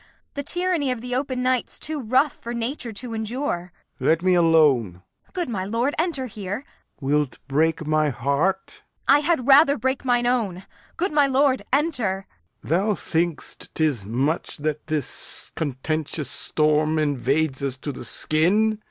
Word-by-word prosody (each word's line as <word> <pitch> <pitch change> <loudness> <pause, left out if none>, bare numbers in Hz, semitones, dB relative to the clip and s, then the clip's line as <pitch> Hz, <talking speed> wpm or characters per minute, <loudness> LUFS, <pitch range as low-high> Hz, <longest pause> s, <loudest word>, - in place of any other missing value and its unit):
The 285 - -3
tyranny 350 -1 0
of 250 -2 -1
the 250 0 -4
open 255 -1 -1
night 255 -1 +1
's - - -7
too 310 -1 -4
rough 260 +4 +2
For 235 +1 -7
nature 235 +1 -2
to 230 +3 -7
endure. 220 -5 -3 0.3
Lear. - - +1
Let 165 +2 +3
me 185 0 +4
alone. 155 - +4 0.3
Kent. - - -32
Good 350 -3 -1
my 195 -5 -2
lord, 230 +8 0
enter 320 -6 0
here. 205 +2 -5 0.3
Lear. 140 +1 +1
Wilt 145 -3 -1
break 160 +3 +1
my 155 0 +2
heart? 140 +10 -1
Kent. - - -44
I 280 +2 +7
had 300 -4 +1
rather 280 +1 +7
break 260 +3 -1
mine 245 -2 +2
own. 210 -7 0 0.3
Good 370 +3 0
my 295 -2 +4
lord, 270 0 +2
enter. 245 - 0 0.4
Lear. 165 +5 +1
Thou 210 +1 +1
think'st 165 -1 -2
'tis 150 -9 +1
much 130 - -1
that 150 0 -3
this 155 -4 -2
contentious 150 0 -3
storm 155 0 +1
Invades 145 0 0
us 135 -2 -2
to 145 +2 -5
the 130 - -8
skin. 200 - +2
195 Hz, 170 wpm, -23 LUFS, 155-255 Hz, 0.4 s, I